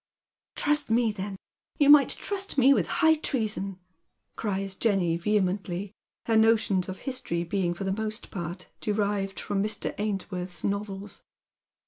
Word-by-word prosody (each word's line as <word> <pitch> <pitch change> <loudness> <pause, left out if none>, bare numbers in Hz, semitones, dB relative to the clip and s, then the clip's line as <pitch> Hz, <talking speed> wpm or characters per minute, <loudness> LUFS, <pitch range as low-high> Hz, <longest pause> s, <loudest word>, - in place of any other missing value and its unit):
"Trust 295 -2 +2
me, 230 0 +3
then. 200 -1 -5 0.4
You 290 - +4
might 295 -2 +8
trust 395 -5 -2
me 270 +1 +7
with - - +1
high 320 -1 +4
treason," 215 -10 -1 0.6
eries 195 -2 -2
Jenny, 190 -5 +1
vehemently, 190 0 -1 0.3
her 225 - +1
notions 220 -4 +3
of 190 - -5
history 255 -11 -2
being 175 0 -1
for 195 - -5
the 190 0 0
most 215 +1 -4
part 175 -1 -5
derived 205 -2 -1
fi - - -5
om 195 - +2
Mr. 215 - -2
Ainsworth's 190 -3 -3
novels. 200 0 -3
205 Hz, 140 wpm, -27 LUFS, 190-225 Hz, 0.6 s, might